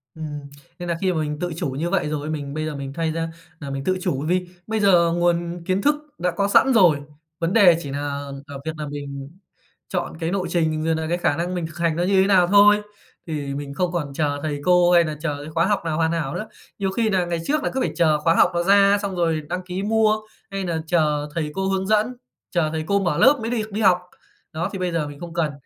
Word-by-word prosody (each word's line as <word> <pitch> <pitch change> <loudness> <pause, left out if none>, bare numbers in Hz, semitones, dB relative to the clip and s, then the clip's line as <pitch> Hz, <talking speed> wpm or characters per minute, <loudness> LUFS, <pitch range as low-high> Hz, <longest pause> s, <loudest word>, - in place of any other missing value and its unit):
Ừm, 160 - -7 0.6
nên 175 0 -5
là 170 - 0
khi 190 -1 +2
mà 160 - -1
mình 150 -1 -3
tự 175 -1 -3
chủ - - -2
như 150 +6 -2
vậy 150 - 0
rồi, 150 0 -3
mình 145 -3 -4
bây 155 +1 -2
giờ 155 -1 -4
mình 135 -1 -6
thay 165 +1 -1
ra 165 0 -2 0.3
là 140 - -7
mình 135 0 -4
tự 185 +5 +1
chủ 140 -3 -1
vì 180 +1 0 0.2
bây 220 0 -1
giờ 175 -5 +4
nguồn 175 0 0
kiến 185 +2 0
thức 295 +4 +3 0.2
đã 180 - 0
có 200 +4 0
sẵn 265 +6 +5
rồi. 175 -10 +5 0.4
Vấn 165 +2 -1
đề 190 -7 +6
chỉ 140 - -6
nà 140 - -3 0.5
ở 140 -2 -8
việc 160 - -1
nà 150 -1 -4
mình 140 -1 -6 0.6
chọn 175 -3 -3
cái 165 +1 -2
nộ 190 -2 -1
trình 160 -3 0
rồi 160 0 +2
nà 160 - -2
cái 175 - +1
khả 150 -4 +1
năng 175 +2 -2
mình 175 -2 -2
kh 165 - -13
hành 165 -2 +1
nó 175 - 0
như 190 +1 +3
thế 190 - +2
nào 185 -3 +5
thôi, 205 +2 +6 0.5
thì 145 -3 -3
mình 140 0 -5
không 180 +2 -1
còn 150 -6 -3
chờ 145 -1 -1
thầy 145 -2 -3
cô 180 -1 +5
hay 175 -1 +6
nà 155 -2 -4
chờ 150 -3 -2
cái 150 - -8
khóa 165 +1 +2
học 205 0 +1
nào 155 -2 -1
hoàn 165 -1 +1
hảo 155 -5 -2
nữa. 215 - -4 0.3
Nhiều 195 -1 0
khi 220 +2 0
nà 185 -3 +1
ngày 170 -1 -2
trước 300 0 0
là - - 0
cứ 265 - -1
phải - - 0
chờ 155 -3 +3
khóa 165 +2 +2
học - - +5
nó 170 0 0
ra 200 +2 +5
xong 200 -2 -3
rồi 165 -3 +1
đăng 180 +1 -3
ký 180 +1 -4
mua, 215 0 +3 0.3
hay 195 0 -3
nà 165 -2 -2
chờ 150 -3 +1
thầy 155 -3 -2
cô 195 0 -1
hướng 190 0 -1
dẫn, 215 +3 +2 0.4
chờ 170 -4 +1
thầy 160 0 -2
cô 200 +1 +2
mở 175 -6 0
lớp 280 +1 +5
mới 225 +1 -3
được 220 -3 -2
đi 215 +2 -2
học. 190 -3 +5 0.6
Đó, 165 +4 -2
thì 195 - -4
bây 180 -1 -1
giờ 165 -3 -1
mình 145 -1 -10
không 170 -1 -8
cần, 165 -3 0
170 Hz, 265 wpm, -22 LUFS, 155-190 Hz, 0.6 s, đề